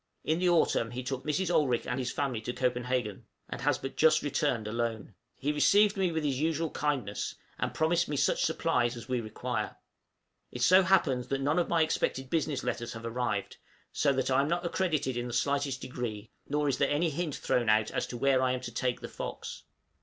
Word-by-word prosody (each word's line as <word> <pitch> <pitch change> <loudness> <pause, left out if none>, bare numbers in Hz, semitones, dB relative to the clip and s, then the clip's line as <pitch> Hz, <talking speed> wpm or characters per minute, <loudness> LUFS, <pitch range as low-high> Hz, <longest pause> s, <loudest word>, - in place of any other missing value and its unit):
In 160 +2 +1
the 180 0 +3
autumn 160 -9 +2
he 125 +2 -5
took 130 0 -4
Mrs. 175 +4 0
Olrik 130 -7 +2
and 125 - -2
his 125 -1 -2
family 135 -6 -2
to 120 +2 -4
Copenhagen, 125 -4 -1 0.2
and - - -6
has - - +2
but 135 - -6
just 155 -1 +5
returned 120 -6 0
alone. 110 -1 -3 0.2
He 145 +2 -1
received 205 +8 +4
me 190 -3 +1
with 160 -1 -2
his 135 -3 0
usual 160 +1 0
kindness, 135 -9 -2 0.2
and - - -1
promised 170 +1 +1
me 150 - -1
such - - +2
supplies 120 0 +1
as 120 - -9
we 125 -2 0
require. 110 -1 -3 0.8
It 125 - -3
so 185 +8 +7
happens 170 -10 +2
that 135 0 -1
none 145 +5 +2
of 175 - 0
my 165 -1 +4
expected 135 -4 -1
business 155 -4 0
letters 120 0 -3
have 115 0 -8
arrived, 115 -4 -2 0.4
so 145 - +2
that 135 0 0
I 130 +1 +4
am 140 - 0
not 175 +2 -1
accredited 155 -8 0
in 120 0 -2
the 120 - -6
slightest 140 +1 0
degree, 115 -4 -5 0.2
nor 150 +1 +1
is 135 - 0
there - - +3
any 155 +3 +1
hint 155 -1 -2
thrown 120 -3 0
out 110 0 +3
as - - -1
to 120 - -6
where 135 +1 +3
I 130 -1 +2
am 130 - -3
to 120 -2 -7
take 125 +1 -1
the - - -5
'Fox.' - - -7
135 Hz, 215 wpm, -30 LUFS, 120-155 Hz, 0.8 s, so